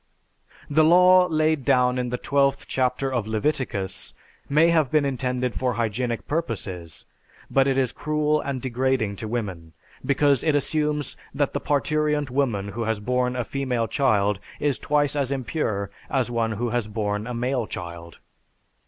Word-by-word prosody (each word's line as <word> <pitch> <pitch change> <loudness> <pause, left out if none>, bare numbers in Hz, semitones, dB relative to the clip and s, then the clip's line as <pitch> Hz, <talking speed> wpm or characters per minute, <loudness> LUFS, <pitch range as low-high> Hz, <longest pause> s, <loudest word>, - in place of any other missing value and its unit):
The 155 +2 +3
law 180 +2 +6
laid 155 -3 +1
down 125 -1 +3
in 125 -1 -2
the 125 - -2
12th 140 +1 +1
chapter 130 +1 0
of 115 -4 -1
Leviticus 110 -5 -2 0.3
may 155 +4 +5
have 160 -5 +3
been 150 0 +2
intended 125 -2 -1
for 125 -1 -1
hygienic 115 +1 -2
purposes 95 - -4 0.5
but 135 0 +4
it 135 -1 +1
is 130 -3 +1
cruel 150 0 0
and 140 -2 -3
degrading 125 -4 0
to 110 - -5
women 95 -8 -4 0.3
because 140 -1 +3
it 155 -2 +2
assumes 150 0 -1 0.2
that 145 -1 0
the - - -2
parturient 150 -1 0
woman 120 -7 0
who 115 +3 -3
has 110 -1 -1
borne 125 +3 0
a 125 - -1
female 125 -3 -1
child 105 -8 +2 0.2
is 145 -4 0
twice 145 -1 +1
as 140 -2 0
impure 115 -7 -2 0.2
as 130 -3 0
one 115 -2 0
who 120 +3 -2
has 120 -2 -1
borne 105 0 -2
a 125 - -4
male 125 -1 -1
child. 85 -1 -8
125 Hz, 160 wpm, -24 LUFS, 110-145 Hz, 0.5 s, law